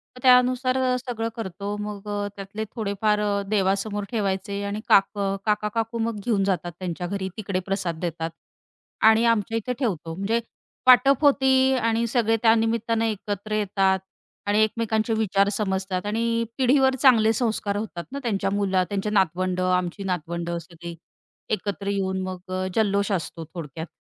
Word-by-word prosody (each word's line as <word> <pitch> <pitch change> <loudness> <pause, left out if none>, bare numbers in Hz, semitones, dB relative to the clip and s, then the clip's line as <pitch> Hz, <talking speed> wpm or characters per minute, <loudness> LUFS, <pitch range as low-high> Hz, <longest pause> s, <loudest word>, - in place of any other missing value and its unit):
मग 250 - -12
त्यानुसार 255 0 +4 0.2
सगळं 230 -3 -3
करतो 200 -1 -5
मग 210 0 -6
अ, 205 0 -2
त्यातले 200 +2 -6
थोडेफार 210 -1 0 0.3
देवासमोर 200 +1 0
ठेवायचे 200 -2 -2
आणि 200 +1 -3
काक 195 0 +6 0.4
काका-काकू 215 +2 -1
मग 225 -2 -1
घेऊन 210 -5 +2
जातात 180 -3 -1
त्यांच्या 175 -1 -4
घरी 190 0 -3
तिकडे 195 -3 -2
प्रसाद 185 -4 -2
देतात. 165 -2 -3 0.7
आणि 220 +1 +6
आमच्या 225 -1 +1
इथे 250 +3 -2
ठेवतो. 175 - -2
म्हणजे 200 +5 0 0.5
वाटप 265 +3 +6
होते 265 -2 +4 0.2
आणि 230 -1 +1
सगळे 225 -1 +2
त्यानिमित्ताने 225 0 +2
एकत्र 205 +1 -5
येतात. 195 -2 +2 0.5
आणि 205 +1 +3
एकमेकांचे 220 0 0
विचार 200 -2 +2
समजतात 190 -2 -2
आणि 230 +2 0
पिढीवर 265 0 +4
चांगले 225 -5 +6
संस्कार 215 -3 -1
होतात 205 -5 -5
ना, 280 - -4
त्यांची 200 -5 -1
मुला 190 -2 +2
त्यांची 200 +1 -2
नातवंडं, 185 -1 +1
आमची 180 +2 -2
नातवंडं 170 -1 -3
सगळी. 170 -1 -9 0.5
एकत्र 200 -1 -3
येऊन 190 -1 -1
मग 185 0 -6
अ, 185 0 -1
जल्लोष 200 -1 +1
असतो 165 -3 -3
थोडक्यात. 160 -1 -6
205 Hz, 140 wpm, -24 LUFS, 190-225 Hz, 0.7 s, काक